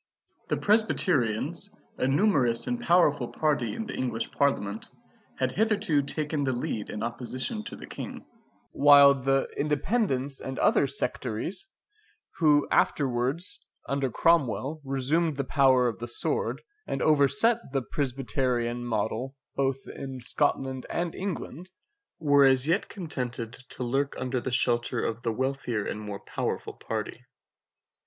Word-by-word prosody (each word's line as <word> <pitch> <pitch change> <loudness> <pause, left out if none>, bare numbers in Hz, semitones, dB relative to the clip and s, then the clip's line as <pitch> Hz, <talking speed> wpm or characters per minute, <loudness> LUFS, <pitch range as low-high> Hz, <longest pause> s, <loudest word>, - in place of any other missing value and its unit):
The - - 0
Presbyterians, 175 - +2 0.3
a - - +2
numerous 135 - +3
and 245 -1 -2
powerful 170 - +3
party 145 -6 0
in 225 - -4
the 220 - -6
English 115 -3 -2
Parliament, 110 -7 -1 0.5
had 130 -1 0
hitherto 205 -5 +2
taken 150 +1 -1
the 130 -1 0
lead 115 -3 -3
in 105 - -4
opposition 125 - -2
to - - -4
the - - -9
King; - - -8 0.5
while 140 0 +7
the 135 0 +1
Independents 145 - 0
and 130 0 -6
other 140 - +3
sectaries, 130 - -3 0.7
who 150 -3 +4
afterwards, 135 +5 +1 0.3
under 140 -1 0
Cromwell, 150 0 +1
resumed 140 +4 0
the 140 - 0
power 130 -2 +4
of 115 - -3
the 120 - -5
sword, 120 - -2 0.2
and 135 - -2
overset 155 - +3
the 135 -2 -1
Presbyterian 125 -3 -1
model 120 +3 -2 0.2
both 135 -1 -1
in 135 -1 -7
Scotland 130 +1 -1
and 170 -1 -2
England, 185 -2 -5 0.5
were 145 -2 +4
as 135 0 +5
yet 175 +5 +1
contented 125 - -4
to 125 0 -7
lurk 135 +3 -1
under 130 -1 -2
the 130 - -3
shelter 120 0 +1
of 115 +1 -3
the 115 - -1
wealthier 125 -3 -2
and 105 - -4
more 105 -1 -6
powerful - - -3
party. 110 +2 -5
135 Hz, 135 wpm, -27 LUFS, 125-155 Hz, 0.7 s, while